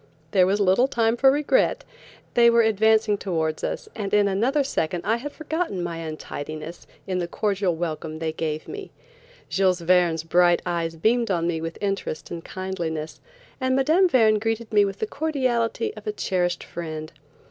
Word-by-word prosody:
There 185 -2 +4
was 200 +2 +1
little 200 +6 +4
time 230 -3 +1
for 265 +3 +5
regret. 295 - +2 0.5
They 235 -1 +6
were 235 0 +5
advancing 220 -1 +3
towards 160 -4 -2
us, - - -3
and 200 -3 -4
in 205 -1 +4
another 240 +9 +1
second 175 - -2
I 225 +3 +2
had 290 +5 -6
forgotten 315 - -3
my 170 -1 -4
untidiness 155 0 -7 0.2
in 185 -1 -2
the 175 - -2
cordial 195 -2 0
welcome 160 -1 -4
they 160 0 -2
gave 155 -1 -4
me. 405 -1 -7 0.6
Jules 185 -2 +1
Verne's 170 -2 +3
bright 175 +1 +3
eyes 170 -2 -2
beamed 230 +7 +1
on 170 -3 0
me 165 -2 -1
with 165 0 -5
interest 195 -5 -3
and 170 -1 -6
kindliness, 170 -5 -5 0.4
and 260 -1 +1
Mme. 315 +8 +4
Verne 220 -8 +4
greeted 225 +1 -3
me 205 -1 +5
with 195 0 -4
the 220 - -1
cordiality 270 - -1
of - - -11
a - - +1
cherished 180 - -1
friend. 155 -2 -6
195 Hz, 170 wpm, -24 LUFS, 170-235 Hz, 0.6 s, They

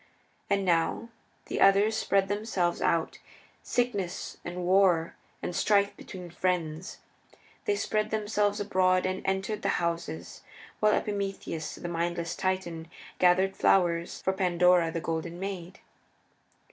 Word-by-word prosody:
And 200 -1 +1
now 170 +6 +1 0.4
the - - -3
others 200 +3 +5
spread 195 -2 +2
themselves 200 -4 -1
out 165 -1 0 0.4
Sickness 205 -8 -2
and 175 +1 -5
War 180 -3 +3 0.3
and 175 - -3
Strife 200 -1 +2
between 180 -3 -9
friends. 175 -1 -2 0.7
They 415 - +2
spread 215 - -1
themselves 210 -1 0
abroad 185 -2 +2
and 185 0 -1
entered 195 +2 -1
the 200 - +1
houses, 170 - -3 0.4
while 215 0 +4
Epimetheus, 195 -6 -3
the - - -6
mindless 170 0 -2
Titan, 175 -4 -2 0.3
gathered 185 +2 +4
flowers 170 -2 +2
for 190 - +1
Pandora, 180 -2 +3
the 165 0 -3
Golden 165 +2 -3
Maid. 190 -2 -6
185 Hz, 120 wpm, -28 LUFS, 170-200 Hz, 0.7 s, others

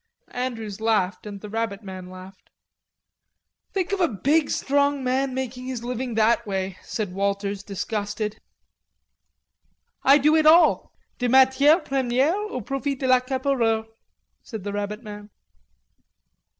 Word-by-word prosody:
Andrews 225 -5 -4
laughed 210 -4 0
and 200 -1 -8
the 210 - -7
rabbit 225 -2 -3
man 185 -2 -8
laughed. 185 +1 -13 1.2
"Think 385 0 -2
of 400 - -1
a 345 - +4
big 285 - +1
strong 285 0 +1
man 260 +1 0
making 255 -1 -4
his 250 -3 -5
living 245 -1 -4
that 225 +2 +3
way," 190 -1 -3
said 205 -5 -4
Walters, 200 0 -2
disgusted. 205 +1 -4 1.6
"I 275 +2 +6
do 300 +2 +3
it 310 -1 +4
all... 335 +3 +5 0.3
de 245 -1 0
matiere 265 +5 +5
premiere 265 +3 +1
au 415 -9 -4
profit 275 +4 -3
de 265 - -2
l'accapareur," 255 -3 +1 0.6
said 220 -5 -8
the 205 0 -4
rabbit 205 +2 -4
man. 210 -1 -9
240 Hz, 130 wpm, -24 LUFS, 205-270 Hz, 1.6 s, I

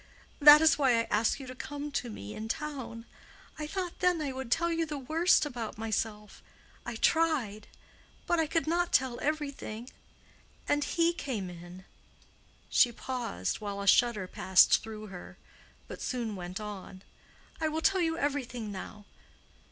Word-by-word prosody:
That 295 0 +10
is 315 -1 +5
why 265 -3 +4
I 230 - +2
asked 215 +6 +2
you 270 - -8
to 255 - -8
come 290 +3 -6
to 250 -3 -2
me 105 - -8
in 220 - -6
town. 250 -3 -5 0.5
I 300 - -3
thought 365 +1 -4
then 360 -2 +2
I 290 -3 -2
would 260 -1 -6
tell 340 +4 +2
you 330 0 0
the 300 -2 -4
worst 315 +6 +3
about 240 -8 -5
myself. 215 -1 -3 0.5
I 240 - -4
tried. 250 -8 +1 0.6
But 345 - +1
I 320 - +2
could 325 +2 0
not 345 +2 0
tell 255 -2 +2
everything. 280 -6 -4 0.8
And 290 0 +2
he 335 +3 +1
came 225 - -4
in." 175 +2 -11 0.8
She 245 - +4
paused, 235 - -4
while 200 -1 -4
a 200 - -4
shudder 215 -1 +4
passed 185 0 +4
through 215 -1 -8
her; 180 - -10 0.5
but - - -9
soon 235 -4 -3
went 180 +2 -6
on. 200 -2 -8 0.6
"I 315 - +2
will 315 +1 -2
tell 385 +1 +3
you 325 -1 0
everything 255 -7 -2
now. 205 +2 -8
255 Hz, 160 wpm, -30 LUFS, 215-305 Hz, 0.8 s, That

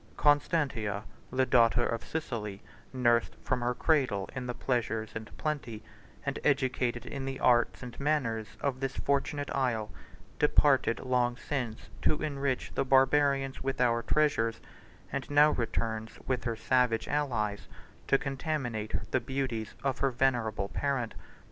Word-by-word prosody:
"Constantia, 140 -9 +2 0.3
the 130 +1 +2
daughter 120 -1 +4
of 115 0 -2
Sicily, 110 -10 -4 0.3
nursed 120 -3 +2
from 130 -1 0
her 120 +1 0
cradle 130 - +1
in 125 -1 -4
the 125 - -3
pleasures 115 -3 -1
and 110 0 -6
plenty, 140 -8 -3 0.4
and - - -2
educated 125 -2 +1
in 135 - -5
the 135 0 -4
arts 120 +1 +3
and 120 -1 -8
manners, 130 -7 0
of 135 -2 -1
this 135 0 -2
fortunate 140 +1 -1
isle, 120 -6 0 0.5
departed 145 -5 +4
long 125 -1 +1
since 125 -7 -4
to 150 - +2
enrich 140 -3 -1
the - - +1
Barbarians 135 0 +3
with 135 0 -2
our 120 -2 +3
treasures, 115 -5 +1 0.5
and - - -3
now 145 +1 +6
returns, 110 -2 -2
with 130 -1 -1
her 115 -2 0
savage 125 0 +2
allies, 115 -9 -1 0.4
to 135 - +5
contaminate 130 -7 -3
the 130 - +3
beauties 125 -3 -3
of 135 -1 0
her 135 - +3
venerable 120 -6 0
parent. 135 -5 -1
125 Hz, 140 wpm, -30 LUFS, 115-140 Hz, 0.5 s, now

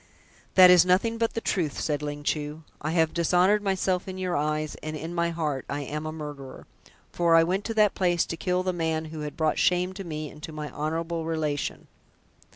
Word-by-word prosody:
"That 185 -1 +9
is 180 -1 +8
nothing 200 +6 +2
but 230 0 0
the 230 - -1
truth," 170 -10 -1
said 150 -2 -1
Ling 145 0 -5
Chu. 150 +1 -2 0.2
"I 155 - -2
have 160 -2 +2
dishonoured 180 +5 +3
myself 190 -2 0
in 185 0 -6
your 185 -1 -2
eyes, 155 +1 -1
and 155 0 -5
in 160 +3 -6
my 170 0 +1
heart 155 -5 -2
I 145 +1 -2
am 150 +3 -4
a - - -3
murderer, 145 -4 -8 0.5
for 170 -1 +3
I 165 - +7
went 190 +4 -1
to 225 - -3
that 210 -2 +4
place 175 -2 +1
to - - -4
kill 180 +2 -1
the 185 0 -1
man 160 -2 -1
who 155 - -6
had 150 -1 -6
brought 155 -1 +1
shame 180 +1 +2
to 195 +1 -7
me 155 -3 -5
and 150 - -14
to 160 - -7
my 150 -1 -6
honourable 165 +2 -2
relation." 155 -3 -2
165 Hz, 215 wpm, -26 LUFS, 150-180 Hz, 0.5 s, That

